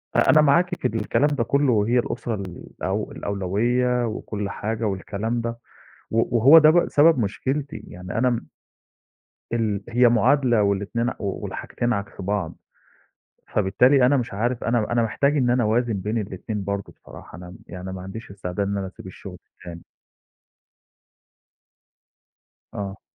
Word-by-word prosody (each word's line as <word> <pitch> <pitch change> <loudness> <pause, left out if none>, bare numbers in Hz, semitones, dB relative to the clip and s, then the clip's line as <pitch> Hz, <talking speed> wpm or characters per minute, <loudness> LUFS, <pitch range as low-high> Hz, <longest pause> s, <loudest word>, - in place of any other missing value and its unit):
أ - - +3
أنا 155 - +7
معاكِ 170 +5 +3
في - - +2
الكلام 115 +6 +1
ده 145 -5 0
كُلّه 140 +3 +2
وهي 115 +3 +2
الأسرة 120 -1 -3
الأو 95 +1 -5
الأولوية 120 +6 0
وكل 105 -2 -4
حاجة 110 +2 -4
والكلام 105 +4 -2
ده، 115 0 -4 0.5
و 115 +1 +1
وهو 135 +8 +8
ده 155 0 +6
ب 175 +2 +3
سبب 155 0 +5
مشكلتي، 135 +7 -3
يعني 90 +3 -7
أنا 125 +2 +3
م 120 -2 -3 1.1
ال 105 -4 -1
هي 120 +1 +4
معادلة 120 -1 +3
والاتنين 100 +4 0
والحاجتين 115 +4 -3
عكس 100 -2 -5
بعض، 100 -3 -2 1.0
فبالتالي 125 +7 +4
أنا 140 +3 +4
مش 125 -3 -3
عارف 115 +4 -1
أنا 115 -2 0
أنا 120 0 +2
محتاج 140 +6 +1
إن 125 -3 +2
أنا 125 0 +2
أوازِن 115 +2 +1
بين 105 +3 -2
الاتنين 105 0 -4
برضه 100 0 -4
بصراحة 85 - -13
أنا 90 0 -10
م 90 - -12
يعني 90 0 -7
ما 95 - -7
عنديش 95 +4 -8
استعداد 100 0 -3
إن 100 0 -2
أنا 95 -1 -3
أسيب 95 - -12
الشُغل 95 0 -10 0.2
التاني. 85 -2 -10 2.9
آه. 100 -1 -6
110 Hz, 150 wpm, -23 LUFS, 100-125 Hz, 2.9 s, وهو